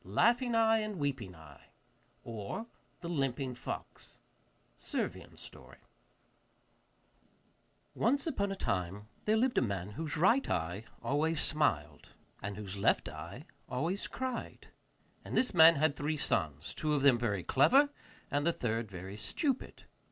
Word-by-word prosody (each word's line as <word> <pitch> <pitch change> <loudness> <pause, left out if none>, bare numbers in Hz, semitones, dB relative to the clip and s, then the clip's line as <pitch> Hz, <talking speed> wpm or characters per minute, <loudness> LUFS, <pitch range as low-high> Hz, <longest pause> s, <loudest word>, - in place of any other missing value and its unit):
] - - -31
Laughing 235 - +2
Eye 225 0 +4
and 215 -1 -3
Weeping 135 - -3
Eye, 80 -3 -15 0.6
or 115 - -5 0.4
the 170 - -5
Limping 135 -5 -1
Fox 125 - -7 0.6
(Servian - - -4
Story) - - -11 2.2
Once 275 +5 +1
upon 200 -11 -1
a - - -2
time 100 - -2 0.2
there 215 +1 +3
lived 245 +2 +3
a - - 0
man 100 -4 -2
whose 155 +7 -4
right 225 - +4
eye 90 +6 -2 0.2
always 155 +3 +1
smiled, 80 - 0 0.3
and 100 0 -5
whose 100 -2 -6
left - - +2
eye - - -8 0.2
always 165 +10 -1
cried; 260 -2 -5 0.5
and - - -3
this 255 - +3
man 165 -1 +9
had 150 0 +2
three 150 +1 -1
sons, 75 - -1
two 155 -1 0
of 140 - 0
them 130 -4 +6
very 105 -6 -1
clever, 275 - +5 0.4
and 145 0 +1
the 170 - +3
third 115 -6 -2
very 95 +1 -7
stupid. 255 - -2
140 Hz, 140 wpm, -33 LUFS, -, 2.2 s, man